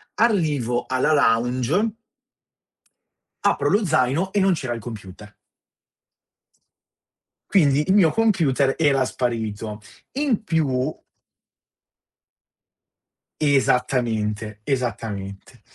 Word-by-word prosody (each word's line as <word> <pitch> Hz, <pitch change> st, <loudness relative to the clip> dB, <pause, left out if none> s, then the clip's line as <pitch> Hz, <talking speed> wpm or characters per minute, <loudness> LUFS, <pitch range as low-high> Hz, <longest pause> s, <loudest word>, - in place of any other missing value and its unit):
arrivo 150 Hz, -, +1 dB
alla 130 Hz, +4 st, +1 dB
lounge... 130 Hz, -, +1 dB, 1.5 s
apro -, -, +2 dB
lo 205 Hz, 0 st, +2 dB
zaino 155 Hz, +4 st, +1 dB
e 205 Hz, -, +1 dB
non 190 Hz, -1 st, +3 dB
c'era 130 Hz, -7 st, -3 dB
il 115 Hz, -, -5 dB
computer. 105 Hz, -2 st, -10 dB, 2.1 s
Quindi 150 Hz, -6 st, +3 dB
il 190 Hz, -, +3 dB
mio 175 Hz, -7 st, +5 dB
computer 155 Hz, -12 st, +2 dB
era 140 Hz, -4 st, +2 dB
sparito. 110 Hz, -4 st, -3 dB, 0.3 s
In 265 Hz, -6 st, 0 dB
più... 150 Hz, -5 st, 0 dB, 2.5 s
Esattamente, 120 Hz, -6 st, 0 dB
esattamente. 110 Hz, -7 st, -4 dB
130 Hz, 80 wpm, -22 LUFS, 115-160 Hz, 2.5 s, mio